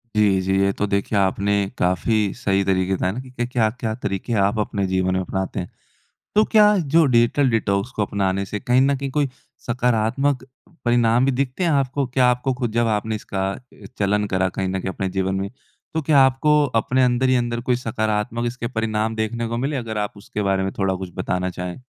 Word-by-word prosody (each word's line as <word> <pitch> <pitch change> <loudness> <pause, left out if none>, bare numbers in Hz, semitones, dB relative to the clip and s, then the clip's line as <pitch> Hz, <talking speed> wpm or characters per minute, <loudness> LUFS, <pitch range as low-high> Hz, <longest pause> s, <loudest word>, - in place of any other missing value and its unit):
जी, 100 -3 +3
जी। 95 +1 0
ये 100 0 +3
तो 105 - -1
देखिए 100 +1 0
आपने 100 +1 +1 0.2
काफ़ी 100 +3 +1
सही 100 -5 0
तरीके 95 0 +1
बताए 95 0 0
ना 115 - -5
कि 125 -2 -4
क्या-क्या 115 -2 -1
तरीके 105 0 -3
आप 105 +2 0
अपने 100 -2 -1
जीवन 95 0 0
में 95 - +1
अपनाते 95 +1 -3
हैं? 90 - -5 0.7
तो 215 +1 +5
क्या 210 -2 +5 0.2
जो 165 -1 +7
डिजिटल 125 +2 +3
डिटॉक्स 105 -1 0
को 105 - +1
अपनाने 100 -1 -1
से 105 +1 -4
कहीं 125 +1 +3
न 140 +1 +3
कहीं 135 0 -4
कोई 145 -1 +1 0.4
सकारात्मक 125 +3 +1
अ, 130 0 -23
परिणाम 120 0 +3
भी 135 - +3
दिखते 130 +6 -1
हैं 170 - +2
आपको? 140 -1 +1
क्या 125 0 +2
आपको 125 +2 0
खुद, 120 -4 -3
जब 120 0 +2
आपने 110 +1 -3
इसका 95 -2 -3
अ, 125 +5 -14
चलन 105 +1 +1
करा 95 -1 +1
कहीं 95 +1 -3
न 95 0 -2
कहीं 95 - -3
अपने 95 - -3
जीवन 95 0 -1
में, 95 +1 -2 0.4
तो 160 - 0
क्या 145 -1 +3
आपको 150 +3 +3 0.2
अपने 130 +3 +1
अंदर 125 +1 +2
ही 130 - +4
अंदर 120 -1 -1
कोई 125 0 +1
सकारात्मक 110 0 -2
इसके 120 0 -4
परिणाम 110 -1 -1
देखने 115 +2 -2
को 115 - -3
मिले? 140 +4 -1
अगर 115 -4 -4
आप 105 0 -3
उसके 105 +1 -5
बारे 95 -1 +1
में 95 - -2
थोड़ा 95 -1 +1
कुछ 95 -1 -6
बताना 90 0 -1
चाहें? 90 +6 -6
110 Hz, 210 wpm, -22 LUFS, 95-125 Hz, 0.7 s, जो